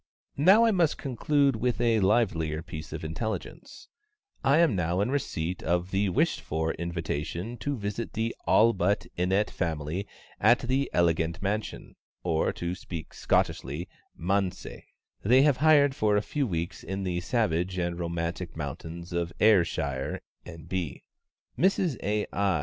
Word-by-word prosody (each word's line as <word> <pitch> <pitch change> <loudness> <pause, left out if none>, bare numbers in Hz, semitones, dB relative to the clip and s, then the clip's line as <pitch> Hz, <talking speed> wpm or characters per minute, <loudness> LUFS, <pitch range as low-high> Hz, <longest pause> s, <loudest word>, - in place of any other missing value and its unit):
Now 190 +10 +6
I 225 - +4
must 175 -6 +2
conclude 140 +1 +1
with 125 +2 0
a 115 -2 +3
livelier 85 -7 +1
piece 80 -2 -8
of - - -5
intelligence: 85 +8 -5 0.6
I 140 +3 +4
am 165 -9 +4
now 85 0 0
in 105 +6 +1
receipt 90 - -2
of 90 +2 0
the 100 +1 +1
wished 90 - +1
for 80 +1 -1
invitation 85 +4 -4
to 145 +4 -3
visit 105 +2 -4
the 115 +2 -2
ALLBUTT 100 -4 +3
INNETT 95 +4 +1
family 80 +3 -3 0.3
at 115 +4 +6
the 130 +2 0
elegant 85 -1 +1
mansion 105 +2 -3 0.3
(or 80 -3 +1
to 85 0 -4
speak 85 -3 -7
Scottishly 75 +8 0 0.3
"manse") 95 +2 -1 0.6
they 125 +6 +5
have 145 -3 +4
hired 145 -2 +5
for 105 -7 +2
a 105 - +1
few 145 +2 -1
weeks 85 -3 -3
in 95 +2 -4
the 90 -2 -1
savage 90 -3 0
and 85 -1 -2
romantic 85 0 -3
mountains 80 +4 -6
of 85 0 -1
Ayrshire, 80 -10 +2 0.3
N.B. 85 -2 -5 0.6
Mrs 180 - +2
A. 105 +1 0
I. 100 -5 +1
95 Hz, 145 wpm, -28 LUFS, 85-115 Hz, 0.6 s, Now